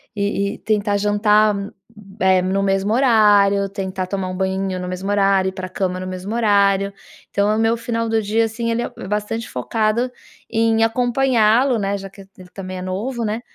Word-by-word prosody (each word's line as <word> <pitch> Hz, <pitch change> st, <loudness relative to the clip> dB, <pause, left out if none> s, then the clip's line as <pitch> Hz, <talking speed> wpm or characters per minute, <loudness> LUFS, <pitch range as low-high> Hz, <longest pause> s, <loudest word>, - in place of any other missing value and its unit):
E 200 Hz, 0 st, -1 dB
e -, -, -13 dB
tentar 210 Hz, -1 st, 0 dB
jantar, 210 Hz, +1 st, +3 dB
hum, 200 Hz, 0 st, -5 dB, 0.5 s
eh, 190 Hz, -1 st, +4 dB
no 190 Hz, +2 st, 0 dB
mesmo 195 Hz, +2 st, +1 dB
horário; 205 Hz, -5 st, +4 dB
tentar 190 Hz, -2 st, -4 dB
tomar 190 Hz, -1 st, -3 dB
um 185 Hz, -, -5 dB
banhinho 190 Hz, -1 st, -1 dB
no 180 Hz, -, -5 dB
mesmo 185 Hz, +2 st, -4 dB
horário; 195 Hz, -2 st, +2 dB
ir -, -, -9 dB
pra 185 Hz, -1 st, -6 dB
cama 185 Hz, -1 st, -2 dB
no 185 Hz, -, -5 dB
mesmo 185 Hz, +4 st, -5 dB
horário. 200 Hz, -3 st, +2 dB, 0.4 s
Então 200 Hz, +1 st, +1 dB
é -, -, +1 dB
o -, -, 0 dB
meu 225 Hz, +1 st, +2 dB
final 230 Hz, -1 st, -2 dB
do 225 Hz, 0 st, +1 dB
dia, 220 Hz, +2 st, +1 dB
assim, 230 Hz, +1 st, -3 dB
ele 235 Hz, +1 st, 0 dB
é -, -, -3 dB, 0.2 s
bastante 210 Hz, +2 st, -3 dB
focado 220 Hz, -, -1 dB, 0.4 s
em 225 Hz, 0 st, +2 dB
acompanhá-lo, 245 Hz, 0 st, +2 dB
né, 200 Hz, 0 st, -1 dB
já 195 Hz, 0 st, -8 dB
que 195 Hz, -, -14 dB
ele 195 Hz, -, -17 dB
ele 180 Hz, -1 st, -13 dB
também 185 Hz, -1 st, -7 dB
é -, -, -6 dB
novo, 225 Hz, +7 st, -3 dB
né, 215 Hz, +3 st, -2 dB
205 Hz, 200 wpm, -20 LUFS, 195-225 Hz, 0.5 s, eh